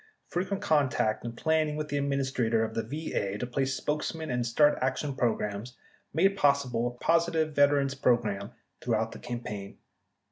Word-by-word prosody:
Fre 175 - 0
quent 195 +1 -3
contact 140 - +1
and 115 0 -6
planning 155 0 +1
with 150 0 -4
the 145 - -1
Administrator 130 -5 +1
of - - -6
the - - 0
VA 110 -6 -3
to 125 - -3
place 135 +2 -1
spokesmen 155 +2 -2
and 125 0 0
start 145 +6 +4
action 130 +2 -1
programs 115 -1 -2 0.3
made 190 +6 +3
pos 140 -6 +3
sible 120 -1 -1
a 120 0 -6
positive 165 0 +2
veterans 145 -1 +3
program 110 -7 +1 0.3
throughout 110 -2 0
the - - -9
campaign. 105 -5 -6
135 Hz, 165 wpm, -29 LUFS, 115-150 Hz, 0.3 s, start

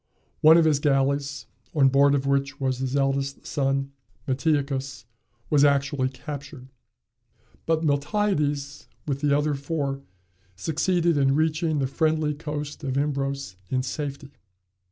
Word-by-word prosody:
One 160 +2 +7
of 165 - +4
his 150 -3 +3
galleys, 140 0 0 0.3
on 135 -3 +5
board 140 +1 +4
of 140 -1 -1
which 140 0 0
was 130 -2 -1
his 130 0 -2
eldest 135 0 -1
son 135 -1 -1 0.4
Metiochus, 135 -3 -1 0.5
was 145 -2 +5
actually 140 -2 +2
captured. 140 0 -9 1.0
But 165 0 +1
Miltiades, 145 -2 0 0.2
with 140 -1 -2
the 145 -1 +3
other 150 0 0
four, 140 -1 -3 0.5
succeeded 165 - +1
in 135 -1 +3
reaching 155 0 +1
the 135 - +1
friendly 155 +2 0
coast 150 0 -6
of 135 -1 -2
Imbros 140 -6 -2
in 130 -1 0
safety. 140 +1 -5
140 Hz, 130 wpm, -25 LUFS, 135-150 Hz, 1.0 s, One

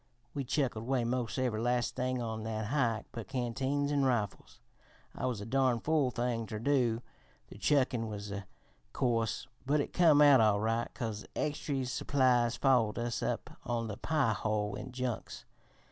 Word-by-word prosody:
We 140 - -2
chucked 135 -1 0
away 120 +3 0
mos' 120 0 -1
every 125 -4 0
last 120 0 0
thing 130 -1 -1
on 110 -1 -3
that 110 0 -3
hike 115 -3 0
but 115 -4 -7
canteens 135 +4 -1
an' 145 -1 +2
rifles. 120 -7 -1 0.6
It - - -6
was 120 -5 -1
a - - -5
darn 130 0 +2
fool 150 +1 +2
thing 120 -2 -2
ter 110 - -4
do 120 -1 +1 0.5
the - - -12
chuckin' 130 -5 +2
was, 105 -1 -6
o' 100 0 -3 0.5
course 115 -3 0 0.2
but 145 +3 +2
it 145 - -2
come 160 -4 +6
out 145 -4 +8
all 105 -2 +4
right, 115 +2 0
'cause 110 -4 -4
extree 145 -3 -1
supplies 125 -2 +2
follered 125 -6 +3
us 120 0 -2
up - - -2
on 115 -1 -2
the 105 - -5
Pie 145 -8 +1
ho 105 0 -1
in 130 - -6
junks. 125 -2 -4
120 Hz, 170 wpm, -32 LUFS, 110-135 Hz, 0.6 s, out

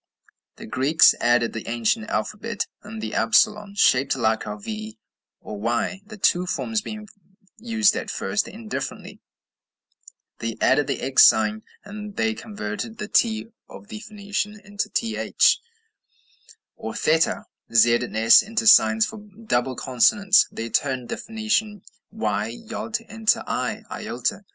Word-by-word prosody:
The - - -10
Greeks 135 +7 +4
added 120 -1 +2
to 115 - -4
the - - -9
ancient 115 -1 -1
alphabet 210 - -3 0.2
the 220 +1 -6
upsilon, 210 -3 +2
shaped 135 -9 +3
like 110 -3 0
our 105 - -5
V 110 +1 -7 0.4
or 105 - -8
Y, 120 - -1
the 215 +1 -12
two 180 -2 +2
forms 220 +4 -2
being 215 0 -8 0.5
used 225 -2 +2
at - - -4
first 210 - -2
indifferently: 220 +1 -7 1.2
they 115 -1 -4
added 135 +2 +3
the - - -2
X 135 -1 +6
sign; 110 -1 +2 0.2
they 210 +1 -3
converted 215 - -6
the 210 - -5
t 220 0 +1 0.2
of 205 - -13
the 220 -2 -7
Phoenicians 210 -1 -4
into 205 0 -4
th, 225 -1 +1 1.2
or - - -7
theta; 160 +1 +1 0.3
z 115 +1 +5
and 120 -2 -1
s 115 +1 +7
into 220 +1 -3
signs 110 - +6
for 220 - -8
double 200 - -3
consonants; 195 - +3
they 115 0 -6
turned 130 -4 -1
the - - -3
Phoenician 220 -2 -2 0.3
y 110 - -2
(yod) 220 - -5
into 225 -1 0
i - - -3
(iota). - - -3
200 Hz, 135 wpm, -23 LUFS, -, 1.2 s, s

